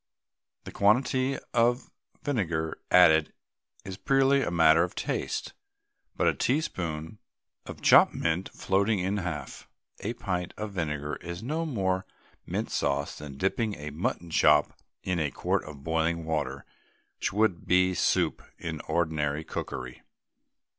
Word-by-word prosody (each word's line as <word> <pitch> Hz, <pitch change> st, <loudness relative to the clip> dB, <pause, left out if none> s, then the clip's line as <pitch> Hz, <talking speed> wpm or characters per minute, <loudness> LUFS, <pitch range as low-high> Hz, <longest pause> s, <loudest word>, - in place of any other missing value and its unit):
The -, -, -8 dB
quantity 130 Hz, +5 st, +2 dB, 0.2 s
of 120 Hz, +2 st, +2 dB, 0.3 s
vinegar 85 Hz, -, -1 dB
added 80 Hz, -4 st, +6 dB, 0.5 s
is 95 Hz, -1 st, -6 dB
purely 135 Hz, +6 st, +3 dB
a -, -, -1 dB
matter 80 Hz, -1 st, +5 dB
of 90 Hz, -, -4 dB
taste, -, -, -3 dB, 0.6 s
but -, -, 0 dB
a -, -, +4 dB
teaspoonful 90 Hz, -, -2 dB, 0.5 s
of -, -, -9 dB
chopped -, -, +7 dB
mint 85 Hz, +3 st, -1 dB
floating 100 Hz, +3 st, +1 dB
in 95 Hz, +2 st, -1 dB
half 80 Hz, -7 st, -5 dB, 0.3 s
a 115 Hz, -, -3 dB
pint 90 Hz, -6 st, -3 dB
of 105 Hz, -1 st, -4 dB
vinegar 75 Hz, -5 st, -3 dB
is 85 Hz, +3 st, -7 dB
no 160 Hz, +6 st, -2 dB
more 95 Hz, -8 st, -1 dB, 0.4 s
mint -, -, -3 dB
sauce 70 Hz, +1 st, -1 dB
than 70 Hz, -2 st, -9 dB
dipping 105 Hz, -, 0 dB
a 75 Hz, +1 st, -7 dB
mutton 85 Hz, +2 st, -3 dB
chop 75 Hz, -1 st, +4 dB, 0.3 s
in 90 Hz, -2 st, -1 dB
a 75 Hz, -2 st, 0 dB
quart -, -, -1 dB
of 75 Hz, -3 st, -10 dB
boiling 80 Hz, +1 st, 0 dB
water 70 Hz, -4 st, -2 dB, 0.7 s
would 100 Hz, -4 st, +1 dB
be 90 Hz, 0 st, +4 dB
soup -, -, +1 dB, 0.2 s
in -, -, -5 dB
ordinary 80 Hz, -3 st, 0 dB
cookery. 65 Hz, -4 st, -6 dB
90 Hz, 135 wpm, -28 LUFS, 80-105 Hz, 0.7 s, chopped